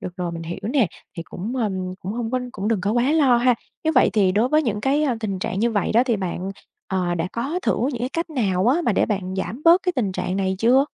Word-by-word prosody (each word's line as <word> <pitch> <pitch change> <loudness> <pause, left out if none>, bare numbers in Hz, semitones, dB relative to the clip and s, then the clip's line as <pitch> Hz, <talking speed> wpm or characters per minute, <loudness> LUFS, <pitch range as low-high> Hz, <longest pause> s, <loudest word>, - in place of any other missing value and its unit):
Được 180 0 -7
rồi, 175 -2 -3
mình 165 0 -6
hiểu 170 +3 -5
nè, 240 0 +2 0.3
thì 165 - -4
cũng, 215 +10 -6
ưm, 190 -5 -2
cũng 195 +3 -4
hông 235 -1 -3
có 255 0 0
cũng 205 +1 -3
đừng 220 -5 +1
có 205 +3 0
quá 245 +5 +2
lo 275 -6 +4
ha! 245 0 +4 0.3
Nếu 320 - +2
vậy - - +5
thì 195 -4 +3
đối 220 +6 +2
với 305 +2 +3
những 210 -5 -1
cái, 280 +4 +2
a, 260 -6 +1
tình 200 -4 -2
trạng 185 - -3
như 235 - +2
vậy 205 -4 0
đó 235 - +5
thì 235 -4 +1
bạn, 185 0 -3 0.4
ờ, 180 -2 -1
đã 175 +1 -2
có 275 +9 -2
thử - - +1 0.2
những 240 - -5
cái 250 - 0
cách 330 +4 -3
nào 200 -8 0
á 295 +8 +3
mà 235 - +2
để - - +2
bạn 190 -3 -2
giảm 225 +9 -4
bớt 340 +3 +6
cái 360 - 0
tình 205 -7 0
trạng 185 +1 -2
này 190 -1 0
chưa? 250 +6 +4
220 Hz, 280 wpm, -22 LUFS, 190-255 Hz, 0.4 s, bớt